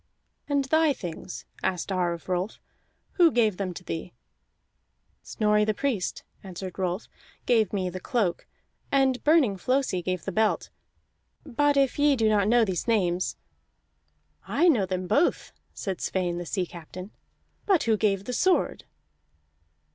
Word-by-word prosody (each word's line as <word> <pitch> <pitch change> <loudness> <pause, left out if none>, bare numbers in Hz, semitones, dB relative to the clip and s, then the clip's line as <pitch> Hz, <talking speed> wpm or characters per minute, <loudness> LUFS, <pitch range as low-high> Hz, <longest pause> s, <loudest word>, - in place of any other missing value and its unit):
"And 280 -1 +1
thy 315 +1 +3
things," 165 - -7 0.2
asked 185 +1 -2
Ar 180 -2 +1
of 170 - -10
Rolf. 185 +3 -2 0.6
"Who 345 -3 +7
gave 220 -7 +2
them 195 -2 -2
to 180 - -8
thee?" 165 +1 -5 1.1
"Snorri 210 -1 +1
the 215 0 0
Priest," 245 -9 -2 0.2
answered 185 -1 -7
Rolf, 185 +2 -2 0.4
"gave 225 -5 +3
me 190 -3 -1
the 185 +1 -5
cloak, 195 -3 -1 0.4
and 265 -2 +2
Burning 295 -10 +4
Flosi 255 -2 0
gave 185 0 -3
the 195 - -2
belt; 215 +3 0 0.7
but 290 +3 +1
if 275 0 +2
ye 290 -1 +4
do 225 -3 +2
not 205 -2 +3
know 235 +1 +4
these 190 +1 -3
names 185 -6 +1 0.6
" - - -35
"I 350 - +5
know 230 - +3
them 185 0 -2
both," 285 - +1 0.2
said 190 -3 -5
Sweyn 175 -2 -1
the 175 - -6
sea 185 -3 -1
captain. 180 +3 -10 0.6
"But 385 -5 +4
who 225 -2 +3
gave 200 -2 +1
the 250 - -4
sword?" 370 +8 +1
205 Hz, 150 wpm, -26 LUFS, 185-255 Hz, 1.1 s, Who